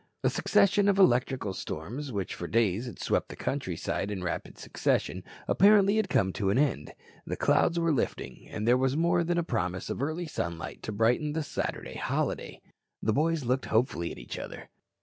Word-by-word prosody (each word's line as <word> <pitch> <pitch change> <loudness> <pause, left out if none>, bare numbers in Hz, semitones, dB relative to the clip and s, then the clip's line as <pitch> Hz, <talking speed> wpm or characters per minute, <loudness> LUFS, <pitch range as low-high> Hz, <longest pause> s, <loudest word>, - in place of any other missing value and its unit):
A - - +3
succession 200 +1 +3
of 195 - +2
electrical 130 - +3
storms 120 - -5
which 100 -4 -3
for 85 - -5
days 115 +1 +1
had 120 - -8
swept - - 0
the - - -7
countryside 100 - -2
in 95 -3 -4
rapid 85 - -4
succession - - -1 0.2
apparently 200 +1 +5
had 215 -3 +1
come 95 -1 +2
to 100 -3 0
an 100 - +2
end. 130 - 0 0.3
The - - -3
clouds 170 - +3
were 165 -1 +2
lifting, 135 - -3
and 110 +1 -3
there 125 +1 +5
was 130 +2 +1
more 170 +1 +3
than 175 +1 0
a 170 - +2
promise 90 - -2
of - - -4
early 160 +5 -2
sunlight 85 - -5
to - - -5
brighten 120 +8 +1
the 160 0 -1
Saturday 145 - -4
holiday. - - -2 0.4
The 110 - +2
boys 155 0 +1
looked 130 +2 0
hopefully 110 -7 +1
at - - -8
each - - -7
other. - - -8
130 Hz, 190 wpm, -29 LUFS, 100-165 Hz, 0.4 s, apparently